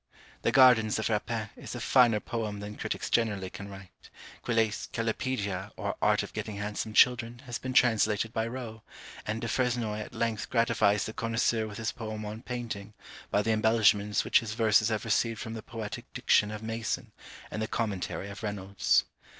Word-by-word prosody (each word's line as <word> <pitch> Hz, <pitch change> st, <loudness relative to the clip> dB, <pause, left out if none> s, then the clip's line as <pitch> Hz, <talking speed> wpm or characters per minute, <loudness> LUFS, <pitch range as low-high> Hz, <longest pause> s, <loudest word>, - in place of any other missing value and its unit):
The -, -, +1 dB
Gardens 125 Hz, -5 st, +6 dB
of 110 Hz, -, -1 dB
Rapin 110 Hz, 0 st, -2 dB
is -, -, -8 dB
a -, -, -4 dB
finer 120 Hz, -3 st, +4 dB
poem 110 Hz, -3 st, -4 dB
than 105 Hz, +1 st, -7 dB
critics -, -, -3 dB
generally 105 Hz, -5 st, 0 dB
can 100 Hz, -, -8 dB
write; 95 Hz, -1 st, -13 dB, 0.3 s
Quillet's 115 Hz, -3 st, 0 dB
Callipedia, 105 Hz, -4 st, -2 dB
or -, -, -2 dB
Art -, -, +3 dB
of -, -, -9 dB
getting 105 Hz, -, -4 dB
handsome 105 Hz, +1 st, -4 dB
Children, 120 Hz, +1 st, +3 dB
has 120 Hz, -2 st, -4 dB
been 130 Hz, 0 st, -4 dB
translated 110 Hz, -2 st, +3 dB
by 110 Hz, 0 st, 0 dB
Rowe; 115 Hz, -3 st, -6 dB, 0.5 s
and 110 Hz, +1 st, -1 dB
Du 115 Hz, -, -2 dB
Fresnoy 120 Hz, -3 st, 0 dB
at 105 Hz, -, -8 dB
length 115 Hz, -3 st, -1 dB
gratifies 115 Hz, -4 st, +2 dB
the 110 Hz, -, -5 dB
connoisseur 115 Hz, -1 st, 0 dB
with 105 Hz, -1 st, -8 dB
his 110 Hz, -1 st, -2 dB
poem 110 Hz, -2 st, -6 dB
on 105 Hz, +2 st, -6 dB
Painting, 115 Hz, -5 st, -5 dB, 0.3 s
by 105 Hz, -, +2 dB
the 115 Hz, -, +1 dB
embellishments 110 Hz, -2 st, +3 dB
which -, -, +5 dB
his 110 Hz, -2 st, -5 dB
verses 110 Hz, -1 st, +4 dB
have 110 Hz, -1 st, -2 dB
received 115 Hz, 0 st, +1 dB
from 110 Hz, -, -5 dB
the 110 Hz, -, -5 dB
poetic 110 Hz, -3 st, -7 dB
diction 105 Hz, -, +3 dB
of 110 Hz, 0 st, -6 dB
Mason, 115 Hz, 0 st, -3 dB, 0.4 s
and 110 Hz, -, -3 dB
the 110 Hz, -, -1 dB
commentary 105 Hz, -4 st, -2 dB
of 100 Hz, -, -9 dB
Reynolds. 100 Hz, -2 st, +1 dB
110 Hz, 180 wpm, -29 LUFS, 105-115 Hz, 0.5 s, Gardens